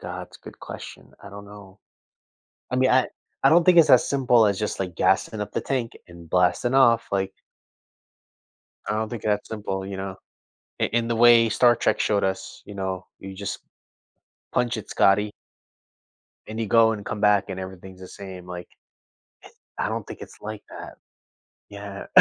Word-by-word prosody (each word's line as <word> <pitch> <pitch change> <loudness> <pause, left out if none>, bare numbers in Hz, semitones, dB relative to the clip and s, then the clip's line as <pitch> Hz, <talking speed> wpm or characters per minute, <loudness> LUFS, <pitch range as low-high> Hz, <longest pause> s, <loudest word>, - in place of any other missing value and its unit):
God, - - -6
it's - - -16
a - - -39
good - - -12
question. - - -10
I 100 - -11
don't 100 0 -10
know 100 -1 -14 0.9
I 125 - -1
mean, 130 0 +3
I 130 0 +3 0.3
I 135 - +6
don't 170 +3 +5
think 180 -1 +6
it's 160 -2 +7
as 125 - +6
simple 125 -5 +4
as 100 -2 0
just, 105 - -3
like, 90 -3 -4
gassing 110 - +1
up 105 0 -5
the - - -1
tank 125 -4 -2 0.2
and 85 -1 -13
blasting 90 +8 +2
off, 120 -4 +4
like 95 -1 -1 1.6
I - - 0
don't 110 0 -1
think 120 - -7
it's - - 0
that 105 0 0
simple, 95 -3 -4
you 100 -1 -6
know, 95 -1 -5 0.6
i - - +3
in 115 0 0
the 115 - 0
way 115 0 +6
Star 120 +2 +4
Trek - - 0
showed 100 -2 +1
us, 95 0 -4
you 105 - -9
know, 95 -2 -4
you 95 0 -9
just, 100 0 -5 0.9
"Punch 125 -1 0
it, 110 - -8
Scotty" 105 +2 +3 1.2
and 110 +1 -6
you 110 - -1
go 115 +2 +5
and 105 -2 -6
come 105 - -5
back 105 -1 +3
and 95 0 -5
everything's 95 0 -10
the 95 - -10
same, 95 -2 -10
like 90 -1 -8 1.1
eh, - - 0
I - - 0
don't - - -4
think - - -9
it's - - -12
like 110 -1 -7
that. - - -9 0.8
Yeah. 100 -1 -8
105 Hz, 190 wpm, -24 LUFS, 95-115 Hz, 1.6 s, it's